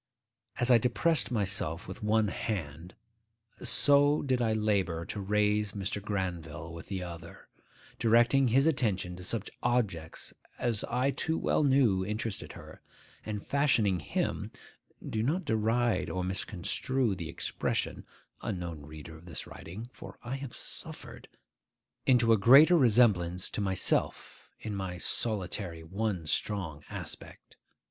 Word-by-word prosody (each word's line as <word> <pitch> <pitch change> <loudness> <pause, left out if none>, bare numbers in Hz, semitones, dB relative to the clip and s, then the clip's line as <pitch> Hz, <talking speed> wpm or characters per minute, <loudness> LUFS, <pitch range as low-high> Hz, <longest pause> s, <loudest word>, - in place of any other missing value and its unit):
As 125 0 +2
I 120 - +7
depressed 125 +7 +1
myself 100 -7 -1
with 95 - -8
one 105 0 +2
hand, 90 -6 -4 0.7
so 145 +1 +4
did 130 -3 +1
I 115 -2 +2
labour 100 -6 0
to 105 - -5
raise 105 +1 +1
Mr. 100 0 -3
Granville 85 -6 -4
with 85 - -9
the 95 -2 -3
other; 85 -1 -9 0.5
directing 120 +4 +4
his 135 +4 +4
attention 105 - 0
to 90 - -9
such 105 +2 -3
subjects 105 -10 -1 0.2
as 115 -4 +1
I 125 +3 +1
too 160 +3 -1
well - - +1
knew 130 -9 +4
interested 105 +1 -3
her, - - -12 0.5
and 105 -2 -4
fashioning 115 -10 +2
him 75 - -2 0.6
(do 110 - -1
not 160 +10 0
deride 110 -2 +1
or 90 - -2
misconstrue 100 +6 -1
the 85 -4 -5
expression, - - -2 0.4
unknown 85 -4 -4
reader 75 +2 -10
of 80 +2 -14
this 85 - -6
writing; 110 +8 -9
for - - -11
I 125 +3 -3
have 135 -3 -7
suffered!) - - -8 0.8
into 120 -3 +5
a - - +5
greater 140 - +8
resemblance 105 - +3
to - - -3
myself 95 -2 0
in 105 -2 -5
my 95 -2 -4
solitary 90 -4 -2
one 95 0 -2
strong 80 -3 -2
aspect. - - -8
105 Hz, 135 wpm, -30 LUFS, 90-120 Hz, 0.8 s, greater